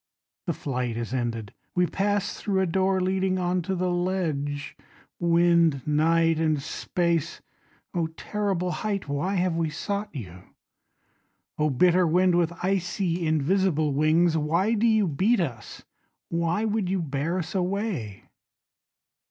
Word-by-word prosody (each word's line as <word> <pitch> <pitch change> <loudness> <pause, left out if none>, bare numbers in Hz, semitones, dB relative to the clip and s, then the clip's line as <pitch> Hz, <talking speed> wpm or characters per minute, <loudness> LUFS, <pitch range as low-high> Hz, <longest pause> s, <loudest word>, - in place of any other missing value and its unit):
The - - +1
flight 125 -4 -3
is 120 +1 -4
ended. 115 -5 -3 0.2
We 180 0 +3
pass 205 +3 -1
thru 200 -3 -1
a 190 - +2
door 190 +2 +1
leading 185 0 +1
onto 180 +1 -1
the 180 0 0
ledge 160 -6 -2 0.4
Wind, 170 -4 +3
night 165 +2 +3
and 155 -2 +1
space 170 +2 -1 0.5
Oh 170 -2 0
terrible 195 -4 -1
height 200 -3 -3
Why 145 +8 -1
have 180 -2 +1
we 165 -1 0
sought 200 +6 -3
you? 90 - -8 1.2
Oh 150 0 +2
bitter 180 +6 +4
wind 180 +2 +3
with 170 -1 +2
icy 180 -2 0
invisible 155 0 +1
wings 160 +3 +3
Why 170 +8 +1
do 230 +1 +2
you 220 -3 +3
beat 195 +10 +2
us? 120 -9 -4 0.5
Why 170 +5 0
would 215 -4 0
you 190 0 0
bear 155 +2 -2
us 175 -2 -4
away? 185 - -2
175 Hz, 135 wpm, -26 LUFS, 155-190 Hz, 1.2 s, bitter